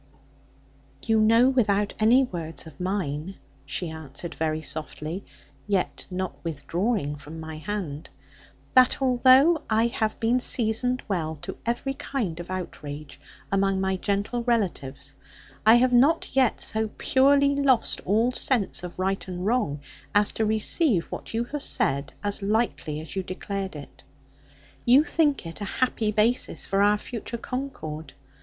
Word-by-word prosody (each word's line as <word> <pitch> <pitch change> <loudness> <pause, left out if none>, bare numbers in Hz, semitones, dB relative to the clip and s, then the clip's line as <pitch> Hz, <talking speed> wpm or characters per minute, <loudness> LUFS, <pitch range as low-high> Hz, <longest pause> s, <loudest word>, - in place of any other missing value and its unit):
'You 225 -1 +2
know, 230 +3 +5
without 210 -6 +1
any 235 +5 +5
words 165 -10 -5
of 160 -4 -13
mine,' 180 -2 -3 0.3
she 165 +3 -3
answered 160 +1 -8
very 155 0 -2
softly, 155 +4 -5 0.4
yet 195 -3 -1
not 185 0 -5
withdrawing 165 - -2
from 155 +3 -10
my 160 -1 -7
hand, 165 -4 -5 0.6
'that 255 -1 +5
although 265 +5 +5
I 220 +1 +3
have 225 -2 -1
been 235 +3 +2
seasoned 245 +1 +1
well 165 -6 -2
to - - -5
every 240 +3 -1
kind 225 - -3
of 175 - -8
outrage, 150 -5 -7 0.3
among 195 -1 +2
my 190 0 0
gentle 205 +5 -1
relatives, 185 - -2 0.5
I 225 - +9
have 250 +1 +3
not 270 +6 +3
yet 260 -3 +3
so 220 0 0
purely 280 +1 +4
lost 270 -4 +2
all 225 +6 +2
sense 250 -4 +1
of 180 - -7
right 190 +1 -1
and 180 0 -5
wrong 210 - 0 0.3
as 205 0 +4
to 220 - -1
receive 220 - +2
what - - -6
you 230 - +1
have 295 - -2
said, 140 - +1
as 205 0 0
lightly 200 -7 -1
as 160 - -9
you 190 - 0
declared 190 0 -5
it. 145 -2 -11 0.8
You 255 +5 +6
think 305 - +1
it 165 +5 -8
a - - -2
happy 230 -4 +1
basis 215 +4 +2
for 195 0 +1
our 205 +1 +4
future 235 +2 -6
concord. 160 - -6
205 Hz, 145 wpm, -25 LUFS, 170-245 Hz, 0.8 s, I